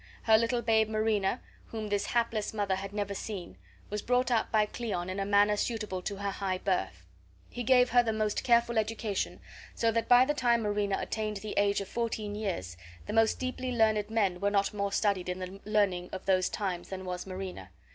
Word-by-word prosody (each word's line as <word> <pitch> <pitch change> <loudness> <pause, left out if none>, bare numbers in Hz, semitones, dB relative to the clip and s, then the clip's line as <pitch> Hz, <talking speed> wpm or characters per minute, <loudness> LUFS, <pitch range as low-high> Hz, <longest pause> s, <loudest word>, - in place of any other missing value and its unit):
Her 220 - +6
little 235 +2 +1
babe 220 -1 +3
Marina, 215 0 0 0.3
whom 220 -2 -5
this 205 -1 0
hapless 230 -3 0
mother 200 -2 0
had 195 +1 -4
never 205 -1 -2
seen, 190 - -6 0.4
was 210 0 -2
brought 250 0 +1
up 225 -2 +1
by 215 -1 +4
Cleon 195 -5 -4
in 190 - -4
a 195 - -1
manner 205 +1 +4
suitable 215 -4 -2
to 200 +2 -4
her 200 0 -3
high 190 -1 -2
birth. 95 - -2 0.5
He 245 - -5
gave 250 +1 +4
her 245 - +6
the 230 -2 -1
most 215 -1 -1
careful 235 -1 +3
education, 215 -2 -2 0.4
so 230 -1 +2
that 230 0 -1
by 245 +1 +8
the 295 - +1
time 240 -4 +2
Marina 205 -1 0
attained 215 -1 -3
the 210 +1 -6
age 200 0 +2
of 195 - -6
fourteen 220 -2 -3
years 175 - -4 0.3
the 210 - -5
most 225 0 +3
deeply 255 0 -3
learned 220 -3 +2
men 200 -5 +1
were 200 +1 +1
not 200 0 +1
more 200 -1 -1
studied 195 -3 0
in 180 - -2
the 185 +1 -7
learning 200 -4 +1
of 190 - -6
those 185 -1 +2
times 185 -4 -3
than 190 -1 -6
was 180 +1 -5
Marina. 185 - -6
210 Hz, 205 wpm, -30 LUFS, 195-225 Hz, 0.5 s, by